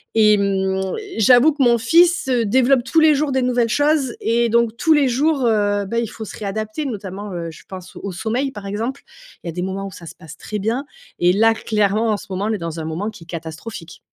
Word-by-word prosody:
Et 210 -1 +5
mmh, 190 -1 -1 0.3
j'avoue 250 +7 +5
que 285 -2 0
mon 235 -1 +4
fils, 335 +6 +3
heu, 240 -3 +2
développe 255 +3 +3
tous 320 +5 +2
les 310 -2 +5
jours 290 0 0
des 260 0 +1
nouvelles 245 -2 +1
choses 290 0 +1
et 235 +1 +1
donc 235 0 +2
tous 320 - +1
les 290 -3 +3
jours, 275 +1 +1
heu, 205 -2 +1
bah, 230 +4 -2
il 235 - -1
faut 220 - -8
se - - -9
réadapter. 215 +7 -4
Notamment, 205 -4 -6
heu, 170 -1 -4
je - - -15
pense 185 -1 -10
au 200 - -6
sommeil, 235 +9 -2
par 205 -5 -9
exemple. 230 +7 -4 0.4
Il - - -8
y - - -2
a - - -5
des 180 - -4
moments 190 +1 -4
où - - -9
ça 170 - -12
se - - -10
passe 160 -3 -12
très 210 -1 -5
bien 235 +8 -2 0.3
et 175 +1 +4
là, 225 +3 +4
clairement, 215 0 0
en 210 - 0
ce - - -11
moment, 190 +2 -3
on 220 - 0
est - - -1
dans 165 -2 -5
un - - -4
moment 170 +7 -3
qui 205 -6 -12
est - - -19
catastrophique. 165 +2 -8
220 Hz, 245 wpm, -20 LUFS, 195-250 Hz, 0.4 s, Et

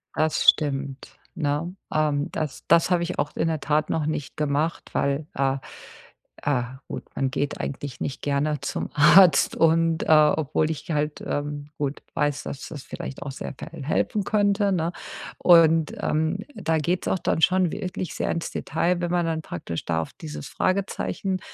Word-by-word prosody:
Das 155 0 +1
stimmt, 140 -2 0 0.2
ne? 155 +2 -1 0.2
Ähm, 150 -1 +1
das 155 -3 -4
das 170 - +5
habe 175 -1 +3
ich 170 - -4
auch 145 +1 -1
in 165 - +1
der 160 -1 0
Tat 150 +1 0
noch 160 -2 0
nicht 150 -1 -3
gemacht, 150 +2 -1
weil, 140 +2 0
äh, 135 0 +1 0.9
äh, 140 -4 +1 0.2
gut, - - -5
man 135 -1 0
geht 145 +1 -2
eigentlich 140 -2 -5
nicht 135 - -3
gerne 145 +1 0
zum 140 - -3
Arzt 155 +1 +6
und, 165 0 +3
äh, - - -6
obwohl 155 0 +4
ich 160 +2 -5
halt, 150 0 -1
ähm, 145 0 -3
gut, 145 -1 -2
weiß, 145 -1 0
dass 140 - -6
das 145 -4 -8
vielleicht 135 - -7
auch 140 - -5
sehr 135 - -6
k 135 - -9 0.2
helfen 195 +8 0
könnte, 205 0 +2
ne? 170 -2 0 0.5
Und, 165 -3 +5
ähm, 160 +4 0 0.2
da 165 -6 0
geht's 170 +4 -1
auch - - +1
dann 160 - 0
schon 185 -1 +4
wirklich 185 -2 -4
sehr - - -1
ins 165 - -3
Detail, 170 +4 0
wenn 175 - -1
man 175 -1 +2
dann 160 -1 -1
praktisch 85 -1 -5
da 80 -1 0
auf 80 - -7
dieses 75 -1 -8
Fragezeichen, 190 0 -1
155 Hz, 175 wpm, -25 LUFS, 145-170 Hz, 0.9 s, Arzt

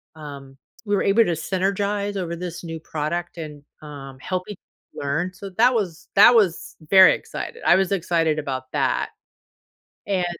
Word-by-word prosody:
um, 140 -3 -10 0.3
we 205 0 +1
were - - +1
able 210 +4 +4
to 175 - 0
synergize 200 +4 -1
over 170 -2 -3
this 175 0 -6
new 165 -1 -6
product 160 +3 -4
and, 150 -3 -8 0.2
um, 135 -3 -10
help 185 +6 -3
each 205 - -7 0.4
other - - -5
learn, 175 +6 -1
so, 195 +1 -9
that 245 +3 +5
was 185 -7 -3
that 205 +5 +8
was 195 -7 +1
very 190 -1 +8
excited. 470 - -7
I - - +6
was 190 0 +1
excited 165 -4 +1
about 130 -3 -4
that, - - 0 1.0
and 185 -3 0
175 Hz, 165 wpm, -23 LUFS, 155-195 Hz, 1.0 s, that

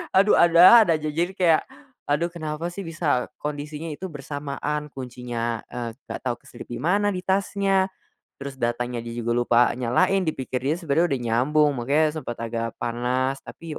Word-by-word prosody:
Aduh, 195 +2 +5
ada-ada 175 +4 +8
aja, 155 0 -3
jadi 170 +4 -1
kayak, 170 -5 +4 0.5
aduh 165 +4 0
kenapa 160 0 -4
sih 195 +1 -7
bisa 155 -6 0
kondisinya 150 +2 -5
itu 180 +6 -6
bersamaan, 145 0 -4
kuncinya, 120 -3 -4
eee, 120 -1 -5 0.2
gak - - -5
tau 125 -2 -1
keselip - - -12
di 120 - -5
mana 205 +5 +2
di 185 - -3
tasnya, 195 0 +1 0.5
terus 140 -1 -7
datanya 120 0 -1
dia 115 - -7
juga 120 0 -2
lupa 120 0 +3 0.2
nyalain 185 +11 +2
dipikir 130 -4 -2
dia 145 +4 +1
sebenarnya 165 0 +1
udah 135 - 0
nyambung 145 +6 +3
makanya 145 +5 +1
sempat 120 - -6
agak 115 0 -3
panas 125 +3 -1
tapi 165 -2 -9
150 Hz, 160 wpm, -24 LUFS, 125-170 Hz, 0.5 s, ada-ada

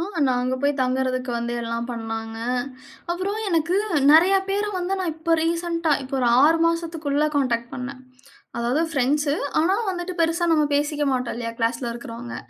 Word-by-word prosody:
ஆ! - - -1 0.2
நான் 250 -1 +1
அங்க 255 +1 -1
போய் 285 0 +3
தங்கறதுக்கு 255 0 0
வந்து 235 0 -3
எல்லாம் 230 0 -3
பண்ணாங்க. 225 -1 -5 0.7
அப்புறம் 380 +4 -2
எனக்கு 335 0 +1 0.3
நெறைய 345 +6 +6
பேர 405 +2 0
வந்து 365 +1 -1
நான் 360 -4 -1
இப்ப 330 +1 +1
ரீசென்ட்டா, 335 -1 0
இப்போ 265 +1 -6
ஒரு 250 - +1 0.2
6 325 +3 +5
மாசத்துக்குள்ள 325 -3 -1
கான்டாக்ட் 235 -3 0
பண்னேன். 255 +1 -6 0.6
அதாவது 240 +6 +1
பிரெண்ட்ஸு. 285 +2 +1 0.3
ஆனா 360 +5 +3
வந்துட்டு 360 0 -4
பெருசா 330 +1 +2
நம்ம 305 -2 +4
பேசிக்க 295 0 0
மாட்டோம் 250 -1 -2
இல்லையா, 230 -1 -4
கிளாஸ்ல 235 +2 0
இருக்கறவங்க. 240 0 -8
290 Hz, 160 wpm, -23 LUFS, 245-335 Hz, 0.7 s, நெறைய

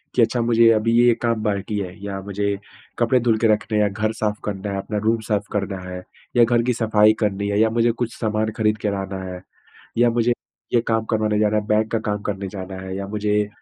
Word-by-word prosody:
कि 125 - +4
अच्छा, 120 +1 +2
मुझे 115 0 +5
अभी 110 +1 +1
ये 120 0 +6
काम 115 -2 0
बाकी 105 0 -1
है, 90 -2 -5
या 100 -1 -4
मुझे 100 0 -2 0.4
कपड़े 120 +2 +3
धुल 115 -2 +2
के 115 - +3
रखने 105 +1 -1
हैं, 105 - +4
या 105 - +2
घर 110 +2 -1
साफ़ 105 -1 0
करना 100 0 -3
है, 100 - -2
अपना 105 +2 -3
रूम 115 +1 +2
साफ़ 105 -1 +1
करना 100 -1 -2
है 90 0 -6 0.3
या 120 - +7
घर 120 0 +2
की 125 +1 +1
सफ़ाई 110 -2 +4
करनी 100 -2 0
है 100 - +1
या 110 0 +4
मुझे 120 +1 +3
कुछ 115 0 -4
सामान 110 -1 0
खरीद 110 -1 +2
के 105 - -1
लाना 95 -1 -4
है 90 -1 -7 0.6
या 120 0 +5
मुझे 120 +1 +2 0.4
ये 120 - +5
काम 110 -1 +1
करवाने 110 -1 +1
जाना 105 0 +2
है, 105 -1 -1
बैंक 110 +1 +1
का 115 - +2
काम 105 0 -2
करने 100 -2 -3
जाना 95 -1 -7
है 95 0 -6
या 100 0 -4
मुझे 105 0 0
105 Hz, 240 wpm, -22 LUFS, 100-115 Hz, 0.6 s, या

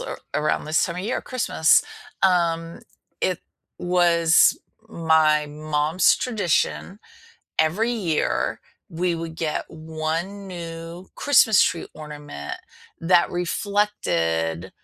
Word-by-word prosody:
a - - -5 0.2
around 155 0 0
this 155 +2 +1
time 170 -2 -4
of 180 - -4
year, 230 +5 -2
Christmas, 235 -10 +2 0.4
um, 170 -3 +1 0.4
it 185 - 0 0.4
was 175 -2 +4 0.3
my 160 -5 +2
mom's 150 +3 +1
tradition, 205 -3 -1 0.6
every 185 +10 +2
year 185 -10 -1 0.3
we 175 +1 -1
would 165 -1 -6
get 155 -2 -2
1 160 +5 -4
new 170 0 -8
Christmas 235 -7 +5
tree 165 -1 -1
ornament 150 - -8 0.5
that 170 +1 +3
reflected 90 - -1
165 Hz, 100 wpm, -23 LUFS, 155-185 Hz, 0.6 s, Christmas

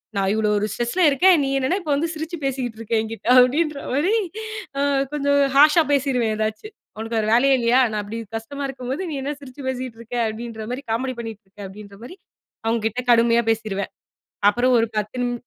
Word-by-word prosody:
நான் 195 -1 +1
இவ்வளவு 215 -1 +1
ஒரு 205 - 0
ஸ்ட்ரஸ்ல 240 +12 -2
இருக்கேன். 360 +6 +5
நீ 270 - -1
என்னன்னா 270 +8 0
இப்போ 310 -4 -3
வந்து 315 +4 0
சிரிச்சு 320 +2 -5
பேசிக்கிட்டு 255 -4 -2
இருக்க 230 0 -5
எங்கிட்டே. 225 0 -7
அப்டின்ற 290 +3 +2
மாரி 315 +10 +2 0.7
அ - - +1 0.3
கொஞ்சம் 285 -1 +1 0.2
ஹார்ஸ்ஸா 300 +3 +6
பேசிடுவேன் 260 -5 +1
எதாச்சும். 220 - -4 0.2
உனக்கு 225 +1 -4
வேற 215 - +1
வேலையா 270 +3 +5
இல்லையா? 235 +2 +3
நான் 210 -1 -2
அப்படி 215 +3 -6 0.2
கஷ்டமா 280 +6 -5
இருக்கும்போது, 265 +3 -5
நீ - - -4
என்ன 280 +2 -3
சிரிச்சு 275 0 -11
பேசிக்கிட்டு 255 -3 -4
இருக்க? 235 +1 -8
அப்படின்ற 220 0 -6
மாரி 255 +3 -4
காமெடி 255 +3 -1
பண்ணிகிட்டு 225 -2 -7
இருக்க? 195 +2 -25
அப்டின்ற 200 0 -12
மாரி 300 +9 -9 0.5
அவங்க 225 0 +1
கிட்ட 235 +3 -3
கடுமையா 235 0 +4
பேசிருவேன். 215 -3 -2 0.6
அப்புறம் 245 +4 +2
ஒரு 230 - +1
பத்து 215 +4 -3
நிமி 245 0 -1
245 Hz, 185 wpm, -22 LUFS, 220-280 Hz, 0.7 s, ஹார்ஸ்ஸா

